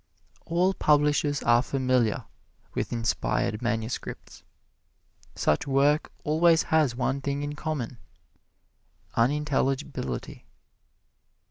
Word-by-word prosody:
All 180 +3 +2
publishers 150 -2 +2
are 120 0 +5
familiar 130 -4 0 0.5
with - - -2
inspired 110 -2 -1
manuscripts. 115 -1 -4 0.9
Such 75 - +1
work 140 +2 +2
always 160 +2 +4
has 150 -6 +3
one 135 +2 -1
thing 140 +1 -2
in 145 0 -3
common 145 -6 -4 1.1
unintelligibility. 135 - -1
140 Hz, 85 wpm, -27 LUFS, 120-150 Hz, 1.1 s, are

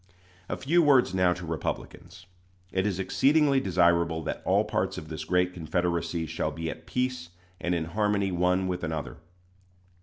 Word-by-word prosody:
A - - -2
few 170 +6 +3
words 135 - +4
now 90 -1 +3
to 90 0 -8
Republicans. 80 +2 -5 0.5
It 95 +2 0
is 95 -3 -1
exceedingly 135 +10 +3
desirable 85 -5 +2
that - - -4
all - - +3
parts - - -2
of 80 - -8
this 80 -1 -5
great 90 +2 +1
Confederacy 85 0 -1
shall 80 +1 -2
be 80 -1 -4
at - - -12
peace 125 -8 -2 0.3
and 90 0 -1
in 80 -2 -1
harmony 100 +2 0
one 90 +1 +1
with 90 -1 -3
another. 80 -2 -4
90 Hz, 160 wpm, -27 LUFS, 85-100 Hz, 0.5 s, words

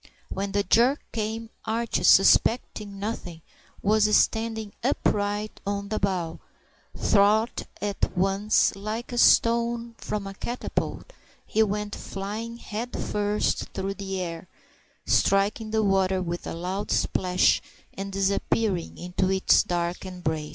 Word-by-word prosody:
When 195 +1 -3
the 205 0 +2
jerk 240 +9 +4
came, 225 +1 -3
Archie, 230 +1 -1
suspecting 205 0 +4
nothing, 185 -6 -5 0.4
was 210 +1 +4
standing 220 -2 0
upright 205 +1 -1
on 200 0 -3
the 215 - -1
bow 180 -4 -1 0.6
thwart, 215 +3 +2
and 205 -1 -2
at - - 0
once, 195 +3 +2
like 215 +5 -5
a 240 - -1
stone 235 0 +3
from 210 -1 -4
a 195 - -6
catapult, 245 - -4 0.3
he 220 - +1
went 210 -1 0
flying 215 +4 -5
head 235 +2 -5
first 210 0 -1
through 195 +1 -2
the 195 -1 -4
air, 170 0 -5 0.6
striking 200 +3 +2
the 220 0 +1
water 190 -1 +2
with 175 -1 -4
a - - -4
loud 185 +4 -4
splash, 180 0 +2 0.3
and 195 +1 -5
disappearing 195 -1 0
into 180 +1 -1
its 190 0 +4
dark 175 0 -2
embrace. 160 -5 -3
200 Hz, 130 wpm, -26 LUFS, 190-220 Hz, 0.6 s, jerk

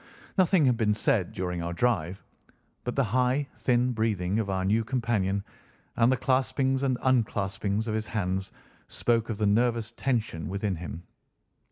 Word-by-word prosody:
Nothing 185 -4 +4
had 125 -3 +3
been 105 -2 +2
said 110 - +1
during 90 -1 -3
our 85 +1 -3
drive, 95 -3 0 0.6
but - - -3
the - - +3
high, 130 +5 +1
thin 125 0 +2
breathing 105 -4 0
of 105 -3 -2
our 95 -1 -1
new 110 +4 +2
companion, 110 -5 0 0.5
and 120 +1 +4
the 130 - +2
claspings 130 +1 +1
and 130 -2 +1
unclaspings 105 -4 0
of 110 - -1
his 110 0 -2
hands, 95 -3 -2 0.4
spoke 115 -1 0
of 110 - -2
the 105 - 0
nervous 115 +2 +2
tension 115 - -2
within 100 0 -1
him. 85 0 -7
110 Hz, 160 wpm, -28 LUFS, 95-125 Hz, 0.6 s, Nothing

